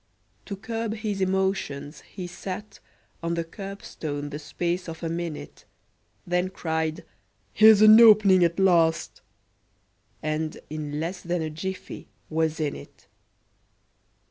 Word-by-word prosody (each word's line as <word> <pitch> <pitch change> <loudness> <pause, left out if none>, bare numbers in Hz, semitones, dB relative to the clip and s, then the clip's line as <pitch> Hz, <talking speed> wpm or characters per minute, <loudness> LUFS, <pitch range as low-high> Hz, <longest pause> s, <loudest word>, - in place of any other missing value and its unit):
To 200 - -4
curb 225 +2 -4
his 210 -3 -3
emotions, 190 -6 -1
he 185 -3 -8
sat 190 +3 -7 0.4
On 170 0 -1
the 170 - -1
curbstone 165 -6 -6
the 150 - -5
space 175 +3 -3
of 160 +1 -8
a 165 - -1
minute, 170 -2 -6 0.6
Then 180 +1 0
cried, 160 -3 -3 0.5
"Here's 215 0 +7
an 215 +2 +9
opening 205 -5 +7
at 170 -1 +1
last!" 170 -4 +2 1.0
And 155 0 -2
in 150 -1 -4
less 175 +4 -4
than 175 -1 -2
a 155 - -4
jiffy 190 +5 -6 0.2
was 160 0 0
in 150 -2 -1
it! - - -13
175 Hz, 125 wpm, -25 LUFS, 160-195 Hz, 1.0 s, an